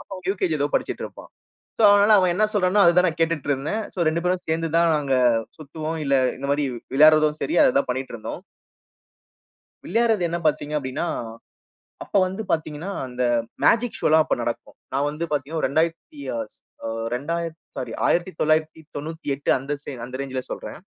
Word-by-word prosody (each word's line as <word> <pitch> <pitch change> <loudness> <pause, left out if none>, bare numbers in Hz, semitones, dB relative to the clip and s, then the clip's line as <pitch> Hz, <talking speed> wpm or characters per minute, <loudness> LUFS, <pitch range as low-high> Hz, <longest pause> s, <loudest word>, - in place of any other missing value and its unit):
அப்போ 195 - -9 0.2
UKG 185 -4 -1
ஏதோ 145 - +2
படிச்சிட்டு - - -1
இருப்பான். - - -10 0.5
சோ, - - -1
அதனால 205 +1 +5
அவன் 185 -2 +3
என்ன 205 +5 +1
சொல்றானோ, 200 0 +3
அத 170 - +6
தான் 180 0 +5
நான் 165 - -3
கேட்டுட்டு 165 -3 0
இருந்தேன். 145 +11 -1
சோ, - - -19
2 160 +2 +1
பேரும் 180 0 0
சேர்ந்து 165 +1 0
தான் 170 0 +4
நாங்க 140 -3 0 0.4
சுத்துவோம், 155 +2 -5
இல்ல, 140 - 0 0.2
இந்த 135 - -6
மாரி 145 0 +1 0.3
விளையாடுவதும் 155 +1 +5
சரி, 140 - -1
அததான் 140 +1 +2
பண்ணிட்டு 130 +1 -3
இருந்தோம். 115 +9 -7 1.4
விளையாட்றது 225 -5 +2
என்ன 170 - -2
பார்த்தீங்க 150 0 0
அப்டின்னா, 130 +4 -3 1.0
அப்ப - - -3
வந்து 190 +4 -4
பார்த்தீங்கன்னா, 160 +2 -2 0.2
அந்த 125 0 -4 0.4
மேஜிக் 235 0 +3
ஷோலாம் 155 0 +4
அப்ப - - 0
நடக்கும். 120 0 -5 0.2
நான் 140 +2 +1
வந்து 150 +3 -4
பார்த்தீங்கனா, 150 +3 -2
ஒரு - - +2
2000த்தி 160 -1 -1
அ - - -2 0.2
ஸ் - - -24 0.6
ரெண்டாயி 165 +7 -2
அ - - -19 0.2
சாரி 125 -3 -4
1998 155 -3 -1
அந்த 135 +3 -5
சே - - -6
அந்த 130 +1 -7
ரேஞ்சுல 130 -1 -3
சொல்றேன். - - -6
155 Hz, 165 wpm, -23 LUFS, 140-170 Hz, 1.4 s, அத